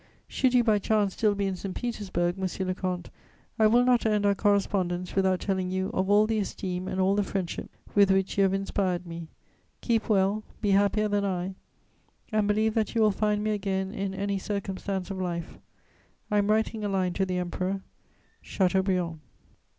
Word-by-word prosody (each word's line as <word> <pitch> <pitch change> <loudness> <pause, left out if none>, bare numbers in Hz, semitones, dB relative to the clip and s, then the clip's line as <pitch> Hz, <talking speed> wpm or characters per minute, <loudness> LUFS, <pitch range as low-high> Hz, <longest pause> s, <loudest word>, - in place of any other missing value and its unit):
"Should 255 -2 +1
you 245 - +5
by 215 -3 +3
chance 205 -1 +1
still 210 -2 +1
be 200 0 -1
in 190 -1 -1
St. 185 +1 -6
Petersburg, 190 -7 -2
monsieur 190 -1 -3
le 185 - 0
comte, 180 -2 -4 0.5
I 220 - +6
will 240 +3 +4
not 250 -1 +4
end 210 -2 +1
our 200 - +4
correspondence 195 -3 0
without 190 -2 +2
telling 190 -2 -1
you 190 +1 -2
of 190 +1 0
all 205 +1 +5
the 220 0 0
esteem 185 -2 -3
and 185 - -3
all 190 +1 +3
the 205 - +2
friendship 195 -3 -3 0.2
with 200 -1 +5
which 190 0 +2
you 200 - +2
have 195 -1 +3
inspired 190 -2 -1
me: 165 -1 -7 0.5
keep 230 -2 0
well; 200 +1 +2 0.2
be 205 -2 +1
happier 205 +2 +3
than 205 -1 0
I, 185 -1 -2 0.8
and 215 -1 +2
believe 215 +1 +2
that 220 0 -1
you 230 - +3
will 215 -1 +5
find 210 +1 0
me 215 - 0
again 190 -1 -2
in 195 -3 -3
any 200 0 -1
circumstance 195 -1 -3
of 190 -1 -4
life. 170 -2 -4 0.7
I 210 - +3
am 205 0 +1
writing 220 0 +1
a 205 - -1
line 185 -2 0
to 190 - 0
the 180 -1 -1
Emperor. 185 +2 -2 0.6
"CHATEAUBRIAND." 185 -3 0
195 Hz, 190 wpm, -27 LUFS, 185-210 Hz, 0.8 s, I